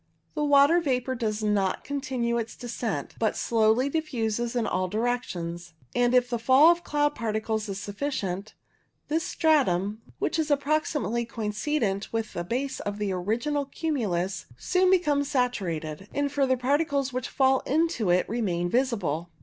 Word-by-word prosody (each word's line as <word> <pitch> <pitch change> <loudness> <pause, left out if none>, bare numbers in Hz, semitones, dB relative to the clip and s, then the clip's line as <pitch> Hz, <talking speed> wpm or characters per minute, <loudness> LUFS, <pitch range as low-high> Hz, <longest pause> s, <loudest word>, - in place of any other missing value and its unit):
The 300 - -1
water 290 +3 +5
vapour 260 -4 0
does 220 -3 -2
not 200 -3 +1
con 285 0 -3
tinue 235 -3 -1
its 225 - -8
descent, 245 -1 -4
but - - +1
slowly 225 +3 +2
diffuses 240 -6 -2
in 235 -2 +1
all 185 -2 0
directions, 175 -6 -3 0.2
and 245 0 +2
if 250 -1 +4
the 240 -1 -2
fall 265 +8 +7
of 345 0 -1
cloud 295 0 +1
particles 220 -2 -2
is 195 0 -4
sufficient, 205 -2 -4 0.5
this 320 +2 +1
stratum, 215 - +1 0.2
which 320 - -1
is 315 -1 0
approximately 285 -5 0
coincident 215 -1 -2
with 225 -1 -3
the 175 - -3
base 260 +9 -2
of 205 0 -4
the 205 -2 -1
original 230 +11 -1
cumulus, 200 - -2
soon 365 - +2
becomes 295 -6 +2
saturated, 190 - -2
and 285 0 0
further 270 -3 +2
particles 280 +1 0
which 255 -1 -2
fall 265 -1 +3
into 315 - +1
it 180 +1 +3
remain 190 -7 -1
visible. 200 - 0
240 Hz, 150 wpm, -27 LUFS, 205-285 Hz, 0.5 s, fall